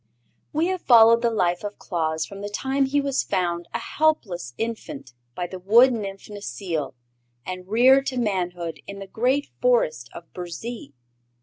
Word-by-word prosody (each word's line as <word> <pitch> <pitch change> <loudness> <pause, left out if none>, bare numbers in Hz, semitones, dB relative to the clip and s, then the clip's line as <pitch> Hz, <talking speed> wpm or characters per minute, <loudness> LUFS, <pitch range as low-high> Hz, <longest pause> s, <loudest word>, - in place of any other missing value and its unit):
We 315 +3 +1
have 375 -1 -2
followed 230 -1 +7
the 235 - +2
life 180 -5 0
of 205 0 -5
Claus 160 -3 -2
from 200 0 -10
the 205 - -4
time 270 +6 0
he 285 +2 +1
was 275 -1 0
found 175 -3 -1
a - - -1
helpless 190 - -1
infant 180 - -5 0.2
by 180 - -2
the 185 +1 -7
Wood 235 +7 +6
Nymph 195 -4 -5
Necile 165 - -4 0.5
and 185 0 -6
reared 260 +6 +5
to 255 - -2
manhood 180 -7 -2
in 200 - -7
the 195 - -7
great 255 +8 0
Forest - - +2
of - - -8
Burzee. 180 - -7
205 Hz, 165 wpm, -24 LUFS, 175-255 Hz, 0.5 s, followed